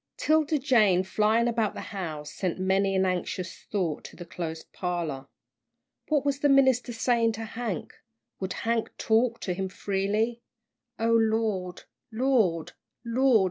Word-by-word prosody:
'Tilda 310 0 +2
Jane, 220 - +4
flying 215 +4 +2
about 225 -3 0
the - - -5
house, 155 -6 -5
sent 185 -3 -2
many 190 +1 +1
an 190 0 +3
anxious 185 0 -3
thought 175 -7 -1
to - - -10
the 175 - -9
closed 165 -2 -6
parlour. 165 -7 -3 0.8
What 295 -3 +1
was 280 -1 0
the 290 - +3
minister 260 -3 +4
saying 230 -1 +2
to 225 +1 -5
Hank? 225 -4 -4 0.5
Would 190 -1 -3
Hank 230 0 -1
talk 230 +1 +2
to 180 - -2
him 190 +1 -3
freely? 205 +5 -1 0.6
"O 230 +1 +1
Lord! 220 -5 +1 0.3
Lord! 220 - +1 0.3
Lord!" 245 0 +4
215 Hz, 140 wpm, -27 LUFS, 185-235 Hz, 0.8 s, Jane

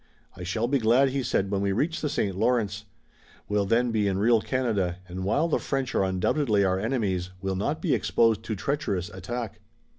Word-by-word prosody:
"I - - -11
shall 110 +7 -1
be 140 +2 +2
glad," 120 +4 +4
he 135 +1 -1
said, 100 -5 0
"when 100 -1 0
we 100 0 +1
reach 155 - 0
the 150 - -1
St. 100 -9 -1
Lawrence. 105 -2 0 0.6
We'll 105 -1 0
then 120 +3 +2
be 105 -2 +1
in 95 -1 0
real 115 +2 +4
Canada, 105 -10 -1
and, 95 +1 -5
while 140 - +2
the 165 - +1
French 135 -2 -2
are - - +2
undoubtedly 105 +4 +1
our 95 0 +1
enemies, 100 -6 -1
we'll 95 0 -2
not 95 - -2
be - - +2
exposed 115 -2 +2
to 110 - -2
treacherous 100 - -2
attack." 110 +3 -5
110 Hz, 200 wpm, -26 LUFS, 95-125 Hz, 0.6 s, glad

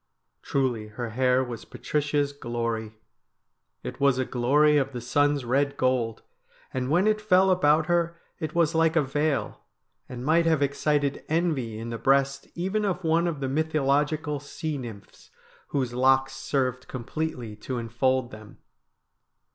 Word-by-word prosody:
Truly 125 -6 -1
her 115 +2 -6
hair 130 +2 +2
was 120 -3 -6
Patricia's 145 -1 -1
glory; 115 -4 -3 0.9
it - - -6
was 140 -2 +3
a 130 - 0
glory 145 +5 +3
of 135 -1 0
the 125 - -4
sun's 145 +2 +1
red 140 +3 +1
gold, 125 -3 0 0.5
and 130 0 -2
when 175 +6 +3
it 215 0 +2
fell 190 -2 +4
about 155 -3 +3
her 170 0 0 0.2
it 155 0 -4
was 165 -1 +3
like 165 0 +3
a 160 - +4
veil, 145 +2 -1 0.5
and 125 0 -6
might 165 +2 +3
have 160 -3 +3
excited 140 0 0
envy 155 -9 0
in 115 +1 -6
the 115 - -4
breast 135 0 +2
even 190 +5 -1
of 190 -2 -1
one 165 +1 +2
of 155 -5 -3
the 135 - -1
mythologi 150 +1 +1
cal 150 -2 -3
sea 150 +2 -5
nymphs 115 -5 -10 0.4
whose 130 -4 -2
locks 135 +1 +3
served 130 -2 -2
completely 125 -3 -4
to 125 +4 -5
enfold 120 +2 0
them. 110 -1 -12
140 Hz, 155 wpm, -26 LUFS, 125-155 Hz, 0.9 s, fell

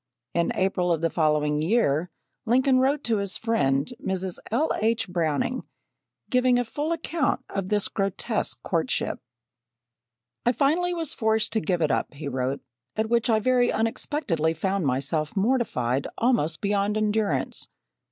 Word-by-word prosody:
In 170 0 +1
April, 185 -2 +1
of 165 -2 +1
the 165 -1 +1
following 150 -2 +1
year, 170 -4 +2 0.4
Lincoln 255 +2 +4
wrote 275 +3 +2
to 230 -2 +1
his 200 -1 -2
friend, 150 - +1
Mrs. 190 -1 -2
L. 280 +8 +1
H. 225 -1 +1
Browning, 175 - -1 0.7
giving 250 -1 +3
a 245 - +2
full 295 +7 -3
account 330 -2 -1
of 195 -1 -3
this 210 -1 +1
grotesque 195 -2 -2
courtship: - - -1 1.2
"I 240 - +3
finally 340 +7 +2
was 325 -4 -2
forced 220 0 +1
to 220 - +2
give 175 -1 0
it 150 - +2
up 145 - -1
[he 145 +1 -6
wrote] 130 +1 -2 0.3
at 220 +1 -1
which 235 0 +2
I 220 -1 +4
very 245 +2 +3
unexpectedly 210 - -1
found 190 0 0
myself 150 +6 -1
mortified 190 - +1
almost 195 - +1
beyond 205 +1 +1
endurance. 210 -10 0
205 Hz, 145 wpm, -26 LUFS, 160-240 Hz, 1.2 s, Lincoln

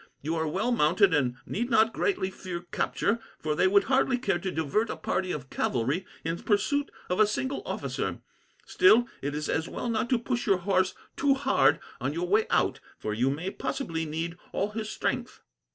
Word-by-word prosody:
You 160 +3 -1
are 160 -1 0
well 200 +10 0
mounted, 195 -2 +4
and 130 -5 +2
need 240 +4 -2
not 225 -1 +4
greatly 190 - 0
fear 180 -2 -6
capture, 215 +4 0 0.2
for 155 -1 -1
they 170 - +3
would 200 +1 +5
hardly 260 -1 +2
care 240 -8 0
to 190 - -3
divert 180 +7 0
a - - -2
party 185 -1 -1
of 135 -5 -5
cavalry 135 +10 0 0.2
in 165 +1 -2
pursuit 280 +7 +1 0.2
of 180 - -1
a 215 - +6
single 265 +6 -2
officer. - - -3 0.5
Still, 245 - +5
it 145 +1 -3
is 150 0 -2
as 160 +1 -1
well 245 - -4
not 225 +1 0
to 250 - +4
push 240 +1 -2
your 195 -2 +4
horse 185 0 +1 0.2
too 275 -1 +3
hard 270 -1 +3 0.2
on 130 +3 -1
your 175 +2 -2
way 215 +4 +3
out, - - +2 0.2
for 105 - -3
you 120 +5 +2
may 160 +8 -2
possibly 165 - -3
need 165 +3 -4
all 205 +2 -1
his 215 0 -4
strength." - - -3
190 Hz, 195 wpm, -28 LUFS, 160-230 Hz, 0.5 s, a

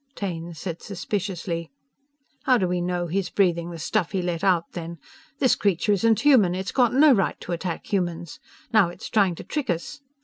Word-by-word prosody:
Taine 170 -4 -5
said 170 +1 -6
suspiciously: 185 -3 -4 0.8
"How 255 -1 +5
do 190 -5 +1
we 180 0 -1
know 175 0 -1
he's 180 +2 -2
breathing 170 -3 +1
the 170 - -7
stuff 165 +3 -1
he 185 -2 0
let 175 -2 -3
out 180 -3 +2
then? 170 -1 -6 0.4
This 260 -3 +3
creature 200 +1 +1
isn't 220 +2 +3
human! 235 -12 +5
It's 190 +1 -3
got 245 -3 +3
no 295 +2 +7
right 195 -6 0
to - - -7
attack 170 0 -3
humans! 175 -4 -2 0.3
Now 210 -6 +5
it's 175 - -9
trying 195 -5 +2
to - - -9
trick 295 -3 -4
us!" 175 - -3
180 Hz, 190 wpm, -24 LUFS, 170-205 Hz, 0.8 s, no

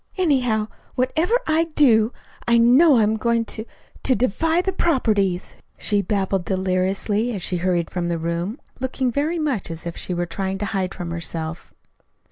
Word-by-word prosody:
Anyhow, 250 - +2 0.3
whatever 320 - +1
I 320 +1 +2
do 245 -8 +4 0.4
I 235 0 +5
know 255 +5 +6
I'm 220 0 +3
going 230 +1 +1
to 220 0 -6 0.4
to 260 - +2
defy 320 - +1
the 380 +1 0
'properties,'" 210 - 0 0.2
she 205 -1 +1
babbled 195 -3 -1
deliriously, 190 +5 0
as 190 - -5
she 180 - 0
hurried 175 -1 0
from 175 -1 -2
the 170 - 0
room, 170 - -3 0.2
looking 260 0 -1
very 300 +7 0
much 285 - -1
as 165 0 -7
if 170 - -4
she 180 - -4
were 175 0 -1
trying 190 +2 -3
to 205 - -3
hide 190 -2 -2
from 175 -2 -5
herself. 165 -1 -5
215 Hz, 165 wpm, -22 LUFS, 185-260 Hz, 0.4 s, know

